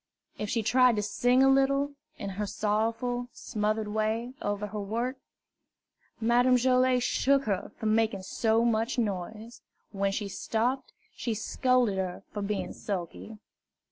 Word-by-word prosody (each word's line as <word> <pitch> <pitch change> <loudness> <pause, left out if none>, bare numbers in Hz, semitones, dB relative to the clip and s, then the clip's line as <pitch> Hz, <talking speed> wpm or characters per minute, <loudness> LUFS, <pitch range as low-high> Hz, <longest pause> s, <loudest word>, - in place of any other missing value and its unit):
If 210 - -3
she 230 0 0
tried 250 +2 +5
to 210 - -1
sing 245 +5 +3
a - - +6
little, 275 +1 +3 0.3
in 200 - -5
her 205 +2 -3
sorrowful, 230 +4 -1
smothered 215 0 -2
way, 220 +3 -1
over 205 0 -2
her 210 0 -5
work, 235 +6 -2 1.0
Madame 245 +2 +4
Joilet 255 0 +3
shook 275 +2 +2
her 200 -5 -2
for - - -6
making 215 -2 +1
so 225 +3 +1
much 230 +2 +1
noise. 215 +1 -3 0.3
When 195 -1 0
she 205 +1 -2
stopped, 230 +6 -1 0.2
she 230 -3 -2
scolded 240 -2 +1
her 185 -1 -3
for 205 - -3
being 200 0 -2
sulky. 200 +2 -5
225 Hz, 140 wpm, -29 LUFS, 210-250 Hz, 1.0 s, a